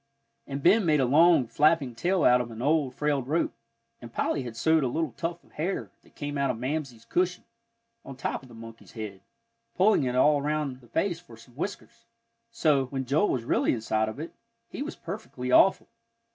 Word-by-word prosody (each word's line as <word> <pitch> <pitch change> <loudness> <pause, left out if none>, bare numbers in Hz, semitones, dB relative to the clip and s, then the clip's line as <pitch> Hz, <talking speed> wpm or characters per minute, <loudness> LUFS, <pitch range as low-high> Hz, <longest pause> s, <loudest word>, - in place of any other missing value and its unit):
And 140 0 -5
Ben 205 +5 +5
made 155 -4 +3
a 130 - +3
long, 160 +2 +5
flapping 145 +2 +2
tail 175 +7 0
out 125 0 +5
of 120 - -6
an 115 -1 -9
old, 145 0 +1
frayed 145 -4 0
rope, 160 +4 0 0.5
and 120 -1 -10
Polly 140 - -1
had 120 -3 -7
sewed 160 +5 +3
a - - +1
little 155 +3 -1
tuft 165 +8 -5
of - - -25
hair, 170 +6 -3
that - - -25
came 145 -1 -4
out 140 -1 +1
of 125 - -1
Mamsie's 130 -2 -4
cushion, 180 +7 0 0.6
on 135 - -9
top 135 - -3
of 130 - -16
the 120 - -13
monkey's 115 0 -12
head, 105 -4 -7 0.5
pulling 190 -6 +4
it 125 0 -1
all 145 +3 +4
around 145 -3 -2
the 120 - -18
face 175 - -1
for 120 -10 -15
some 120 +2 -17
whiskers; 180 +10 -7 0.4
so, 155 - +2
when 130 0 -4
Joel 150 +10 +2
was 125 - -1
really - - +1
inside 110 -1 0
of 110 - -8
it, 160 - -6 0.3
he - - -7
was 295 - -4
perfectly 165 - -6
awful. 190 - +5
140 Hz, 200 wpm, -27 LUFS, 125-165 Hz, 0.6 s, Ben